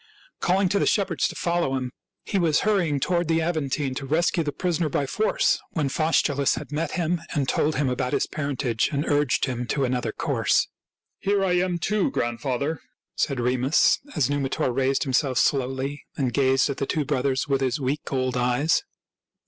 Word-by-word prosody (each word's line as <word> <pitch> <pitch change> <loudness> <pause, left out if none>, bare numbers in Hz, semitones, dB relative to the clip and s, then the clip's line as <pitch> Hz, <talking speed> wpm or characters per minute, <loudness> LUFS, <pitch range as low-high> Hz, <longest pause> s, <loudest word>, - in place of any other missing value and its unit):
Calling 190 +2 +2
to 200 +1 +1
the - - +1
shepherds 200 -2 +1
to - - -8
follow 170 -6 0
him, 130 -1 -3 0.3
he 195 - 0
was 160 -4 +2
hurrying 180 -9 +1
to 165 - -1
ward 175 -2 +1
the 165 0 +2
Aventine 150 -4 -1
to 140 - -5
rescue 165 +3 +2
the 145 - -2
prisoner 170 -1 -1
by 140 - 0
force, 215 +11 +1
when 150 -4 0
Faustulus 145 -2 +2
had 150 -1 -7
met 155 +3 -2
him 175 -1 0
and 140 -3 0
told 155 +4 +1
him 140 0 +1
about 125 0 -1
his - - +2
parentage 140 -6 -1
and 145 0 -1
urged 145 -3 +2
him 125 -2 -3
to 140 +1 0
another 125 -1 -1
course. - - +1 0.3
" - - -69
Here 200 0 +1
I 185 - +1
am, 180 0 +1
too, 205 +4 0
grandfather," 125 +6 -2 0.3
said 140 -3 0
Remus, 125 +4 +3 0.2
as 150 -6 +2
Numitor 140 -2 -1
raised 135 +1 +1
himself 130 -1 +1
slowly 135 +1 0
and 130 -4 0
gazed 135 0 +3
at 135 - -5
the 140 - -2
two 150 -2 -1
brothers 135 -2 0
with 135 -1 +1
his 130 +1 0
weak 140 +2 -3
old 130 -2 0
eyes. 125 +5 +2
140 Hz, 190 wpm, -25 LUFS, 130-165 Hz, 0.3 s, Remus